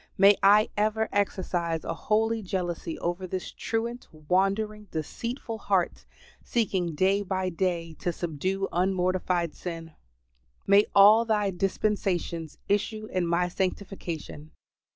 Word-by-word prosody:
May 200 +1 +7
I 205 +3 +6
ever 215 +1 +1
exercise 175 -5 -1
a - - -3
holy 220 +5 0
jealousy 175 -4 -3
over 175 +2 -3
this 185 0 -4
truant, 235 +2 -3
wandering, 195 +7 0
deceitful 230 - -5
heart; - - 0 0.4
seeking 190 -8 -1
day 195 +5 +2
by 190 -1 -1
day 170 -2 -2
to 175 - -1
subdue 180 +4 -2
unmortified 180 -2 0
sin. 165 -2 -7 0.7
May 200 +1 +5
all 210 +3 +8
Thy 210 -3 +1
dispensations 180 -4 -1
issue 215 +2 0
in 180 -2 0
my 170 +1 +2
sanctification. 180 -5 -4
190 Hz, 115 wpm, -27 LUFS, 175-210 Hz, 0.7 s, all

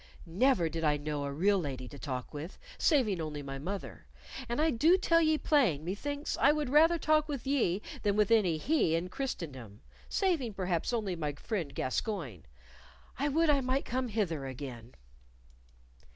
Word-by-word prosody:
Never 185 +1 +2
did 165 +1 -4
I 150 -1 +3
know 145 -1 -3
a 140 - -3
real 195 +7 +2
lady 135 -6 -4
to 140 - -11
talk 130 -2 -5
with, 150 +5 -7 0.2
saving 225 - +2
only 150 -2 -5
my 135 0 -6
mother, 195 +7 -6 0.4
and 240 - -1
I 315 +1 +3
do 320 +10 +4
tell 335 -2 +3
ye 315 -1 +3
plain 225 - +2
methinks 285 - -3
I 280 - +6
would 300 -3 -1
rather 325 +4 +5
talk 310 -1 +2
with 280 -4 -4
ye 230 -9 +1 0.2
than 205 -2 +1
with 210 0 +2
any 190 -8 +4
he 175 - +2
in 170 +2 -2
Christendom 135 - -6 0.3
saving, 320 - 0
perhaps, 180 -1 -1
only 210 -6 -1
my 150 -3 -3
friend 160 - -4
Gascoyne. 130 - -3 0.7
I 285 - +1
would 320 +2 +3
I 280 -2 +2
might 260 +2 0
come 255 +1 -2
hither 175 - -2
again." 125 -3 -8
195 Hz, 170 wpm, -31 LUFS, -, 0.7 s, I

